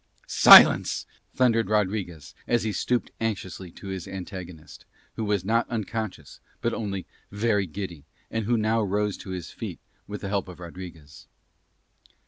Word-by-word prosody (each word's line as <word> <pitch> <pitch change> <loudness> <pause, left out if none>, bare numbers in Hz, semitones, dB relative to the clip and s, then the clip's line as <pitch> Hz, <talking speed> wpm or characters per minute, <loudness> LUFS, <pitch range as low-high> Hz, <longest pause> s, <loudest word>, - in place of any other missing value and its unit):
"Silence," - - +8 0.3
thundered 115 -4 +2
Rodriguez 95 -7 -1
as 120 -2 +2
he 110 - -1
stooped 120 +3 -1
anxiously 95 -4 -3
to 100 - -9
his 95 -2 -5
antagonist, 90 -4 -8 0.3
who 110 - -3
was 105 -3 0
not 115 +3 +1
unconscious 110 - -5 0.2
but 115 - -1
only 100 -4 -4 0.3
very 105 -2 +1
giddy 85 -3 -7 0.3
and 115 -1 -2
who 120 +2 +2
now 110 +1 +1
rose 105 0 0
to - - -10
his 90 -2 -6
feet - - -6 0.3
with 105 0 -6
the 100 - -4
help 100 -2 -1
of 90 -1 -11
Rodriguez. 85 -4 -11
100 Hz, 145 wpm, -26 LUFS, 90-110 Hz, 0.3 s, Silence